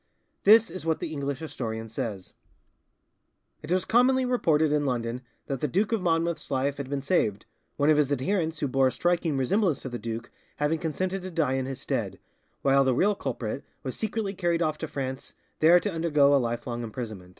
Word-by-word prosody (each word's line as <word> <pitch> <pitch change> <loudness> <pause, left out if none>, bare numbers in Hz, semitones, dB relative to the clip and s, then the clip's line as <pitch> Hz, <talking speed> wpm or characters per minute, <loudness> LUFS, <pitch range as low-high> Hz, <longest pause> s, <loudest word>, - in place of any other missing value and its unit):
This 220 +2 +7
is 185 - -6
what 160 -1 +1
the - - -4
English 140 -2 -2
historian 115 -8 -5
says: 105 -4 -5 1.3
"It 150 - -7
was 185 0 +2
commonly 255 +3 +4
reported 160 -12 +2
in 150 -1 +2
London 120 -1 -2 0.2
that 135 -3 -3
the 150 - +1
Duke 195 - 0
of 225 -3 +1
Monmouth's 170 -1 0
life 140 0 0
had 140 -2 -5
been 140 -1 -2
saved, 110 - +1 0.3
one 145 +2 +4
of 150 - +4
his 145 -2 +2
adherents 160 +3 -1
who 145 - +1
bore 135 0 +3
a - - +1
striking 175 -3 0
resemblance 165 - +1
to 130 - -4
the 120 -1 -5
duke 115 +2 -5 0.2
having 150 +2 0
consented 185 +4 -2
to 185 - -6
die 160 -6 0
in 130 -1 -1
his 135 -2 -6
stead, - - -2 0.5
while 135 0 +5
the 130 -2 +2
real 205 +10 +3
culprit 125 - -4 0.2
was 130 - -3
secretly 220 -2 -2
carried 175 -3 0
off 155 -1 -1
to 160 - -3
France, 135 -2 -5 0.2
there 170 +3 +7
to 205 - -2
undergo 150 -4 +3
a 140 - +4
lifelong 120 0 -3
imprisonment." 110 -5 -6
145 Hz, 195 wpm, -27 LUFS, 130-175 Hz, 1.3 s, This